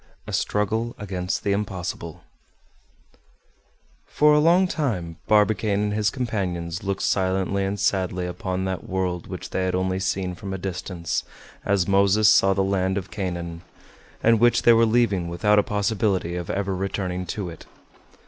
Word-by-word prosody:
A -, -, -7 dB
STRUGGLE 110 Hz, +3 st, -1 dB
AGAINST 95 Hz, -3 st, -3 dB
THE 100 Hz, -, 0 dB
IMPOSSIBLE 95 Hz, -5 st, -4 dB, 1.8 s
For 150 Hz, 0 st, +4 dB
a 150 Hz, -, +5 dB
long 175 Hz, +4 st, +4 dB
time 100 Hz, -, -2 dB
Barbicane 105 Hz, -1 st, +3 dB
and 105 Hz, 0 st, -1 dB
his 105 Hz, 0 st, +1 dB
companions 90 Hz, -9 st, -3 dB
looked 95 Hz, -1 st, -2 dB
silently 95 Hz, +1 st, +1 dB
and 100 Hz, +1 st, -3 dB
sadly 95 Hz, -2 st, 0 dB
upon 95 Hz, +1 st, -3 dB
that 95 Hz, +4 st, -4 dB
world 90 Hz, -2 st, -2 dB
which -, -, -7 dB
they 95 Hz, -, 0 dB
had 90 Hz, -, 0 dB
only 95 Hz, 0 st, 0 dB
seen 95 Hz, -1 st, -1 dB
from 95 Hz, +2 st, -6 dB
a -, -, -3 dB
distance, 90 Hz, -2 st, -3 dB, 0.4 s
as 100 Hz, -3 st, +1 dB
Moses 100 Hz, +2 st, +4 dB
saw 95 Hz, -1 st, +5 dB
the 95 Hz, -, +2 dB
land 95 Hz, 0 st, 0 dB
of 95 Hz, 0 st, -5 dB
Canaan, 85 Hz, -5 st, -4 dB, 0.6 s
and 115 Hz, -1 st, +5 dB
which 120 Hz, +1 st, +4 dB
they 120 Hz, -, +7 dB
were 115 Hz, 0 st, +4 dB
leaving 110 Hz, -6 st, +2 dB
without 105 Hz, +5 st, +2 dB
a -, -, +6 dB
possibility 100 Hz, -4 st, 0 dB
of 90 Hz, -1 st, -5 dB
ever 100 Hz, -1 st, -1 dB
returning 90 Hz, -1 st, -3 dB
to 95 Hz, 0 st, -4 dB
it. 85 Hz, -, -12 dB
95 Hz, 160 wpm, -24 LUFS, 90-105 Hz, 1.8 s, they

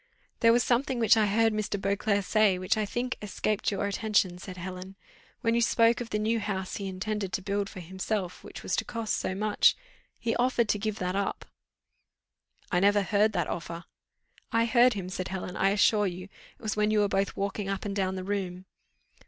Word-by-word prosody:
"There 230 Hz, -1 st, +6 dB
was 240 Hz, +1 st, +4 dB
something 250 Hz, +1 st, +1 dB
which 230 Hz, -1 st, +5 dB
I 215 Hz, -2 st, +3 dB
heard 225 Hz, +2 st, +3 dB
Mr. 215 Hz, -1 st, -2 dB
Beauclerc 200 Hz, +1 st, 0 dB
say, 215 Hz, -3 st, +3 dB
which, 185 Hz, 0 st, 0 dB
I 215 Hz, -1 st, -1 dB
think, 245 Hz, +4 st, -2 dB
escaped 210 Hz, 0 st, -1 dB
your 200 Hz, 0 st, -1 dB
attention," 200 Hz, -3 st, +1 dB
said 185 Hz, 0 st, -8 dB
Helen. 185 Hz, +1 st, -7 dB, 0.5 s
"When 230 Hz, -2 st, +2 dB
you 235 Hz, -, +2 dB
spoke 230 Hz, 0 st, +3 dB
of 235 Hz, -, -5 dB
the 210 Hz, -, -1 dB
new 220 Hz, +2 st, +1 dB
house 190 Hz, -3 st, -3 dB
he 200 Hz, -, -4 dB
intended 195 Hz, +1 st, -3 dB
to -, -, -1 dB
build 200 Hz, 0 st, -1 dB
for 185 Hz, -, -9 dB
himself, 190 Hz, +1 st, -4 dB
which -, -, -10 dB
was -, -, 0 dB
to -, -, +1 dB
cost 230 Hz, -2 st, -3 dB
so 185 Hz, -, -2 dB
much, 210 Hz, +1 st, +3 dB, 0.4 s
he 230 Hz, -1 st, -1 dB
offered 240 Hz, -2 st, +2 dB
to 210 Hz, -, +1 dB
give 215 Hz, 0 st, -2 dB
that 180 Hz, -1 st, -2 dB
up." 200 Hz, 0 st, -2 dB, 1.3 s
"I 180 Hz, -, +3 dB
never 205 Hz, +1 st, +4 dB
heard 210 Hz, +2 st, +2 dB
that -, -, 0 dB
offer." 170 Hz, 0 st, -5 dB, 0.7 s
"I 230 Hz, 0 st, +3 dB
heard 240 Hz, +2 st, +5 dB
him," 190 Hz, -3 st, -5 dB
said 185 Hz, 0 st, -4 dB
Helen, 185 Hz, -1 st, -5 dB
"I 195 Hz, -, +3 dB
assure 205 Hz, +1 st, +3 dB
you: 185 Hz, +1 st, -6 dB, 0.3 s
it -, -, -25 dB
was 215 Hz, -, -1 dB
when 210 Hz, 0 st, +2 dB
you 215 Hz, -1 st, +3 dB
were 205 Hz, -, +3 dB
both 195 Hz, 0 st, -1 dB
walking 200 Hz, 0 st, -2 dB
up 195 Hz, +1 st, -3 dB
and 200 Hz, -1 st, -3 dB
down 190 Hz, -1 st, 0 dB
the 185 Hz, -, -4 dB
room." 185 Hz, -2 st, -3 dB
205 Hz, 210 wpm, -28 LUFS, 190-220 Hz, 1.3 s, There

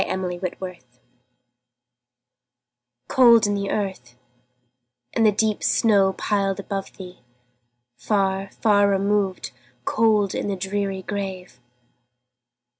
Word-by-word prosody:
Emily 180 Hz, -2 st, -3 dB
Brontë 180 Hz, -1 st, -3 dB
Remembrance 170 Hz, -10 st, -10 dB, 2.1 s
COLD 235 Hz, -4 st, +6 dB
in 205 Hz, -, 0 dB
the 200 Hz, -1 st, -2 dB
earth, 190 Hz, -13 st, -4 dB, 1.0 s
and 225 Hz, -, +3 dB
the -, -, +5 dB
deep 215 Hz, 0 st, 0 dB
snow 200 Hz, -4 st, +3 dB
piled 195 Hz, -1 st, -1 dB
above 195 Hz, 0 st, -6 dB
thee! 180 Hz, -1 st, -10 dB, 0.8 s
Far, 195 Hz, -, -1 dB
far 205 Hz, -2 st, +2 dB
removed, 195 Hz, -1 st, 0 dB, 0.3 s
cold 215 Hz, -3 st, +2 dB
in -, -, -3 dB
the 200 Hz, -, -1 dB
dreary 195 Hz, 0 st, -3 dB
grave! 190 Hz, -9 st, -6 dB
195 Hz, 105 wpm, -23 LUFS, 190-205 Hz, 2.1 s, COLD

